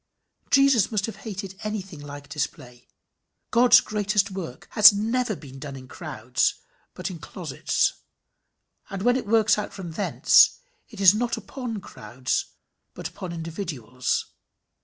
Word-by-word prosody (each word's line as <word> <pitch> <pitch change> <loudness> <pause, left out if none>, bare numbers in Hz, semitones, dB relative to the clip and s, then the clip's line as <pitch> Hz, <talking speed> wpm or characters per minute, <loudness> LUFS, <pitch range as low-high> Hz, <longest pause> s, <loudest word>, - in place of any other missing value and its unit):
Jesus 275 -7 +4
must 205 -2 0
have 225 - -7
hated 195 -3 -7
anything 195 -6 -5
like 145 0 -9
display. 125 -4 -5 0.6
God's 245 +1 +7
greatest 205 -1 0
work 175 -9 -7
has 215 0 +9
never 225 +2 -1
been 135 -5 -12
done 140 -1 -7
in 130 -1 -10
crowds, - - -1 0.4
but - - -4
in - - -8
closets; - - -1 1.0
and 195 0 -5
when 245 +1 +4
it 255 -5 -3
works 215 -1 +3
out 210 - -5
from 185 -4 -7
thence, 195 +5 +4 0.3
it - - -12
is 195 -1 +7
not 235 +2 -1
upon 240 -6 -6
crowds, 125 - -3 0.5
but - - -5
upon 185 -2 -7
individuals. 160 - -3
195 Hz, 140 wpm, -25 LUFS, 145-215 Hz, 1.0 s, has